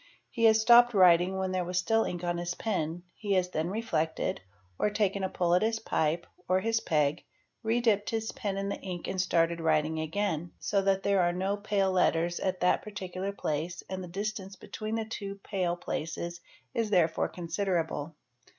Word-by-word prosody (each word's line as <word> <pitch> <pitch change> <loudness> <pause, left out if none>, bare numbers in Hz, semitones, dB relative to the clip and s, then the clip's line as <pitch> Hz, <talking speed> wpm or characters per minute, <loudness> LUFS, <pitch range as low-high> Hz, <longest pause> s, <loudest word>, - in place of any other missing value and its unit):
He 230 -2 +1
has 220 0 +6
stopped 240 +1 +7
writing 180 0 +5
when 190 -1 -1
there 185 -1 0
was 180 +1 -3
still 225 +5 +2
ink 175 0 -4
on 175 0 -1
his 175 0 -3
pen, 170 -5 -2
he 205 -2 -2
has 180 -1 +1
then 160 0 -1
reflected, 165 - -1 0.4
or - - +2
taken 200 -2 0
a 190 - 0
pull 175 -2 +1
at 180 - +4
his 225 +1 +1
pipe 165 -4 0 0.2
or 185 +1 +4
his 225 +3 +1
peg, 150 -4 +1 0.4
re 230 +1 +1
dipped 210 -4 +2
his 225 -1 -2
pen 200 -2 -3
in 195 0 -2
the - - -3
ink 180 -3 -5
and 185 - 0
started 170 -2 +1
writing 155 0 +1
again, 170 0 -2
so 200 -1 0
that 195 0 +1
there 200 -2 +3
are 175 0 +3
no 190 +3 0
pale 205 -2 0
letters 175 -2 +2
at 185 -1 -2
that 180 - +3
particular 190 -2 -5
place 165 -2 -3
and 185 0 -3
the - - -7
distance 195 +1 -4
between 215 +2 -5
the 225 -1 -1
two 200 -3 -5
pale 180 -4 -1
places 170 0 -4 0.3
is 225 -2 0
therefore 170 -5 +2
considerable. 170 -3 -2
185 Hz, 190 wpm, -29 LUFS, 170-205 Hz, 0.4 s, stopped